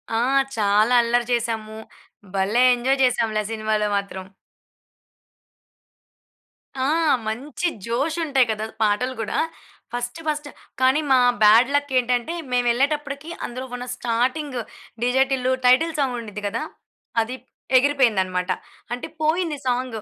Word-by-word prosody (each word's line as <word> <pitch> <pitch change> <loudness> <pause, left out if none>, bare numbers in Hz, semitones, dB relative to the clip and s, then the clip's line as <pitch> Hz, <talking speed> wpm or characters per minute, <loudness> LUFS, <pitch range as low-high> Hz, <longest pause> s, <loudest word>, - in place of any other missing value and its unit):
ఆ! - - +2 0.4
చాలా 210 +3 +3
అల్లరి 240 +1 +1
చేసాము. 220 -2 -2 0.6
భలే 200 +6 +2
ఎంజాయ్ 265 +3 0
చేసాంలే 225 -4 +1
సినిమాలో 215 -1 0
మాత్రం. 190 -2 -5 2.6
ఆ! - - +2 0.4
మంచి 290 +10 -3 0.2
జోష్ 275 +8 -1
ఉంటాయి 270 -5 +3
కదా! 215 0 -3 0.2
పాటలు 215 +5 +1
కూడా. 220 - -3 0.6
ఫస్ట్ 245 +5 -4
ఫస్ట్, 295 -1 -2 0.3
కానీ 260 +4 +4
మా 260 - +6 0.2
బ్యాడ్‌లక్ 260 +7 +5
ఏంటంటే, 245 +5 -1 0.2
మేమెళ్ళేటప్పటికి 275 +5 0 0.2
అందులో 255 +2 -6
ఉన్న 245 0 -6
starting 255 +4 -1 0.5
DJ 255 +2 +4
Tillu 255 -1 +1
title 290 +7 +4
song 260 -3 0
ఉండిద్ది 210 -2 -8
కదా! 225 +3 -3 0.6
అది 235 +3 -4 0.4
ఎగిరిపోయిందన్నమాట, 210 -10 +1 0.4
అంటే 245 - -5
పోయింది 315 0 +1
సాంగు. 245 -3 -1
245 Hz, 110 wpm, -23 LUFS, 220-275 Hz, 2.6 s, మా